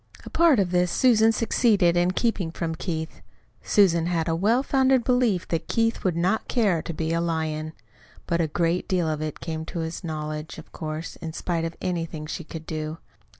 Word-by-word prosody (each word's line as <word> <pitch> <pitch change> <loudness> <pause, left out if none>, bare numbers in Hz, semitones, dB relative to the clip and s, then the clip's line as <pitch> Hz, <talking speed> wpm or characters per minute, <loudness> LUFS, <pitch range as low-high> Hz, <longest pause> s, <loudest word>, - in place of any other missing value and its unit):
A - - -9
part 330 -5 +5
of 185 -3 +1
this 180 0 +2
Susan 225 -3 +4
succeeded 215 -5 +3
in 175 +1 +3
keeping 190 -3 0
from 165 0 -3
Keith 160 -1 -4 0.4
Susan 170 -5 +3
had 165 -2 0
a 165 - +1
well 220 +9 +2
founded 265 -2 +3
belief 245 -8 +2
that 165 -1 -2
Keith 225 0 0
would 185 -3 +1
not 180 +6 0
care 205 -9 +2
to - - -5
be 160 0 -2
a 170 - +1
lion. 160 -2 -2 0.5
But 170 0 0
a 160 - +1
great 170 +3 0
deal 180 -3 +1
of 155 -1 -2
it 155 -1 -4
came 160 -1 -4
to 170 - -4
his 160 +3 -5
knowledge, 155 -1 -5
of 160 - -12
course, 155 0 -5
in 165 -2 -6
spite 165 -1 -2
of 165 0 -5
anything 165 -4 -3
she 165 - -5
could 160 0 -8
do. 155 0 -4
170 Hz, 195 wpm, -25 LUFS, 160-200 Hz, 0.5 s, part